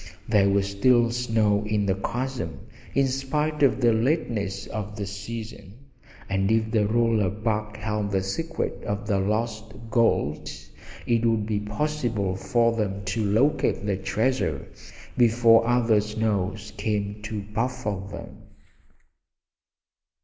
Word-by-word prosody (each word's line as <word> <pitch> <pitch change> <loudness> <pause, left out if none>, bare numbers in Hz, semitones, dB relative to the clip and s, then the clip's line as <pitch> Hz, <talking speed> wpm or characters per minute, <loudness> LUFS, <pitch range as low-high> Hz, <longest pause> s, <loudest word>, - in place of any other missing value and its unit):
There 100 -3 +4
was 100 0 +1
little 120 +1 +4
snow 110 -4 +1
in 105 -1 0
the 95 - +2
chasm, 115 - -4 0.3
in 140 - +4
spite 150 +4 -1
of 135 -3 +4
the 120 -1 +5
lateness 110 - 0
of 105 0 -5
the 100 -1 -3
season, 100 0 -7 0.5
and 95 +1 +1
if 110 0 +1
the 105 -3 +2
roll 115 0 +2
of 100 +2 -2
bark 110 -1 -1
held 105 -1 -2
the 95 -1 0
secret 165 +12 -3
of 105 0 -3
the 100 -2 +1
lost 110 +2 -2 0.2
gold 95 - +1 0.6
it 115 -1 +2
would 115 -2 +2
be 105 -1 -1
possible 105 -3 -1
for 115 +3 +1
them 100 -2 -2
to 110 +3 -1
locate 130 +3 +2
the 100 -2 +1
treasure 110 +7 -1 0.5
before 115 -1 +5
other 120 -3 +3
snows 105 -1 -2
came 105 0 -2
to 105 -1 -4
baffle 115 -4 -1
them. 100 +1 -9
110 Hz, 135 wpm, -25 LUFS, 100-120 Hz, 0.6 s, the